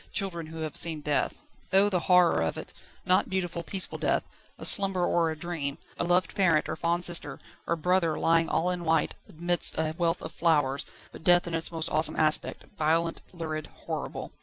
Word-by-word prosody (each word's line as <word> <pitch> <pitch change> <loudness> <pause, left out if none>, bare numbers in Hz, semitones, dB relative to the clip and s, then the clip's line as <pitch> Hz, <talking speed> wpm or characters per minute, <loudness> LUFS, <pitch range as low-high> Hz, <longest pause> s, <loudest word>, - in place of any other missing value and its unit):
Children 170 -6 -3
who 160 0 -8
have 155 -2 -5
seen 160 -3 +2
death! 145 -1 -1 0.4
Oh, 195 +2 +5
the 185 -3 0
horror 180 - +3
of 80 -1 -2
it! - - -8 0.3
Not 185 0 +2
beautiful, 175 -3 -3
peaceful 185 +4 +1
death, - - 0 0.3
a - - -4
slumber 195 -3 +5
or 170 -1 +1
a 160 - -5
dream, 150 -4 -4 0.2
a - - 0
loved 175 0 +1
parent 170 -6 +2
or - - -3
fond 170 +2 -1
sister 175 -1 +2 0.3
or 170 - +1
brother 170 -1 +1
lying 165 0 +2
all 180 +2 0
in 180 -1 -4
white 160 -2 +1 0.2
amidst 175 +2 +1
a 155 0 -1
wealth 170 -1 0
of - - -6
flowers, 145 -5 0 0.2
but - - -12
death 175 0 +4
in 170 - -6
its 165 +1 0
most 165 -1 -4
awesome 155 +1 +2
aspect, 155 0 0
violent, 165 +2 0
lurid, 155 -3 -5 0.2
horrible. - - -5
165 Hz, 190 wpm, -27 LUFS, 155-175 Hz, 0.4 s, Oh